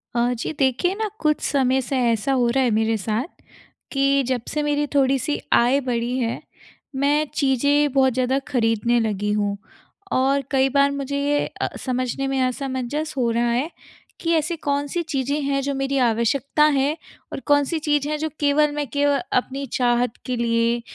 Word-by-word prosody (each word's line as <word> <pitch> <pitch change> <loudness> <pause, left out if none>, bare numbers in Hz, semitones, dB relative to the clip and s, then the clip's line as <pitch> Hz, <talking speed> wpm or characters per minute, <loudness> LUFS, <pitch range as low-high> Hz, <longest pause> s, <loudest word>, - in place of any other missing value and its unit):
अ, 240 +1 +2
जी 235 - -4
देखिए 270 +7 +2
ना 435 +1 -2
कुछ 305 -1 +1
समय 265 -1 +1
से 260 +1 -3
ऐसा 225 +4 -1
हो 250 -2 +2
रहा 260 +3 +2
है 245 - +2
मेरे 220 +1 +1
साथ, 215 +4 -2 0.7
कि 275 0 +2
जब 255 -2 0
से 300 - -1
मेरी 295 0 +1
थोड़ी-सी 275 +1 +2
आय 250 +4 +4
बढ़ी 245 -1 -2
है, 230 -2 -2 0.5
मैं 290 +3 +2
चीज़ें 285 +2 +2
बहुत 265 -2 +3
ज़्यादा 255 +2 +1
खरीदने 235 -2 +1
लगी 210 -2 -1
हूँ 205 -1 -1 0.5
और 275 +2 +2
कई 270 -1 +3
बार 280 +1 +3
मुझे 280 0 -3
ये 290 +1 +1 0.2
अ, - - +1 0.2
समझने 255 +1 -1
में 270 -1 0
असमंजस 265 +4 -3
हो 240 -2 +1
रहा 235 +1 +1
है 255 +7 0 0.5
कि 335 0 0
ऐसी 315 +2 0
कौन-सी 285 +3 -1
चीज़ें 285 -2 -2
हैं 275 0 0
जो 280 +1 -2
मेरी 270 +1 -1
आवश्यकता 245 +6 +1 0.2
है 290 +4 0 0.4
और - - -4
कौन-सी 290 +2 +2
चीज़ 295 -2 0
हैं 305 - -1
जो 315 +1 -2
केवल 295 +1 +3
मैं 295 -1 -2
केव 285 0 +2 0.2
अपनी 270 +2 -1
चाहत 245 -1 +1
के 255 - -2
लिए 235 0 +1
270 Hz, 175 wpm, -22 LUFS, 240-285 Hz, 0.7 s, आय